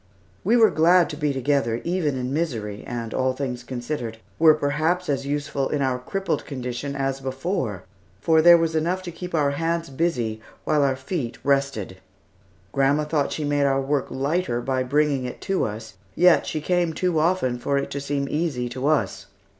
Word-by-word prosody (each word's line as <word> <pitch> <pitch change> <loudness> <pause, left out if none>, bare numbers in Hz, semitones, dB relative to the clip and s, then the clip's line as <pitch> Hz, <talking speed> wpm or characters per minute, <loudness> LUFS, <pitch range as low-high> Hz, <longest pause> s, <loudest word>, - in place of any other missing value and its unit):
We 225 +6 +4
were 220 -3 +6
glad 170 +2 +4
to - - -5
be 150 -1 0
together, 130 -3 0
even 165 -6 0
in 125 +1 -3
misery, 115 -10 -2
and 115 -2 -4
all 130 0 +1
things 130 -2 -4
considered, 120 -2 -4 0.2
were 160 -1 +7
perhaps 155 +5 0
as 140 -1 -1
useful 145 -1 -1
in 145 -2 0
our 130 -1 0
crippled 195 +10 -2
condition 130 +1 -5
as 135 -1 -1
before, 130 - -3 0.4
for 160 +7 +4
there 170 +1 +8
was 165 -1 0
enough 175 +4 0
to 175 - -6
keep 180 +1 -6
our 145 -3 +2
hands 165 +1 -2
busy 125 -8 -1 0.2
while 150 -1 +2
our 135 -2 +2
feet 130 -2 -4
rested. 135 -9 0 0.7
Grandma 140 +4 +2
thought 150 -1 0
she 155 - -3
made 145 -1 +1
our 135 -1 +2
work 135 0 0
lighter 140 -1 -1
by 130 +1 -1
bringing 140 0 +1
it 125 - -6
to 195 -2 0
us, 110 -1 -7 0.2
yet 180 -1 +5
she 155 - -2
came 175 0 +1
too 175 0 0
often 155 -7 +1
for 140 +3 0
it 140 - -2
to 140 - -3
seem 140 0 -2
easy 145 -5 -1
to 130 +3 -3
us. 110 -10 0
140 Hz, 185 wpm, -24 LUFS, 130-160 Hz, 0.7 s, there